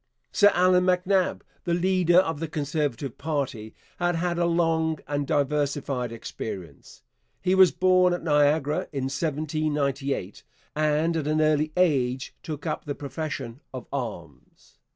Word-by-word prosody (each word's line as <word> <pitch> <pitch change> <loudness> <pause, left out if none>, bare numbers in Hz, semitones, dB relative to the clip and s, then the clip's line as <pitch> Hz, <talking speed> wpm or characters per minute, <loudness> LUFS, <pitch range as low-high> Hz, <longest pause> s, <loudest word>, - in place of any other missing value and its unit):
Sir 205 - +5
Allan 180 0 +4
MacNab, 185 +1 +1 0.2
the 170 -2 0
leader 180 -1 +3
of 165 -5 +3
the 165 - -3
Conservative 145 -4 -3
party, 140 -8 -3 0.2
had 175 0 +1
had 170 +1 -1
a 170 - +2
long 165 -2 +1
and 145 -1 -2
diversified 140 -3 0
experience. 95 - -8 0.4
He 185 0 +1
was 190 -1 +7
born 185 -1 +4
at 175 - -2
Niagara 150 -1 +2
in 135 -3 -3
1798, 140 - -2 0.3
and 155 +2 +1
at 155 -3 -1
an 155 +1 +1
early 155 0 +2
age 130 -7 +1
took 155 -3 -6
up 155 - -3
the 145 -2 -3
profession 140 -4 -5
of 130 - -6
arms. 85 - -7
150 Hz, 135 wpm, -26 LUFS, 140-170 Hz, 0.4 s, was